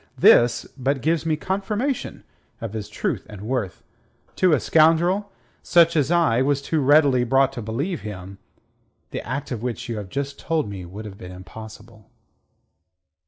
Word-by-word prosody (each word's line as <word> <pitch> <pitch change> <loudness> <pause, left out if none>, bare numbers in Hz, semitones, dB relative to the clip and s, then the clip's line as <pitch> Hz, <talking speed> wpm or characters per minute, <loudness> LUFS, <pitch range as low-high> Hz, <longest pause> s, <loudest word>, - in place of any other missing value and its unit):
this 120 0 +5
but 135 +1 -1
gives 160 +4 0
me 155 - +2
confirmation 205 - -3 0.4
of 115 -2 -6
his 110 -2 -5
truth - - -2
and 105 -2 -9
worth. 115 -5 -3 0.5
To 185 -2 +4
a 150 - +4
scoundrel 170 +8 +3 0.3
such 170 -1 +4
as 145 -3 +2
I 165 -9 +3
was 140 +1 +2
too 155 +3 -1
readily 140 -2 +5
brought 135 +2 +2
to 125 - -5
believe 140 - -3
him, 95 -2 -8 0.7
the - - -4
act 135 +4 -5
of 120 -4 -3
which 120 -1 -4
you 115 - -3
have 100 -3 -6
just 140 +4 -4
told 160 -7 -1
me 95 -3 -7
would 100 +5 -9
have 100 -2 -10
been 90 - -9
impossible." 110 +3 -12
135 Hz, 165 wpm, -23 LUFS, 110-160 Hz, 0.7 s, this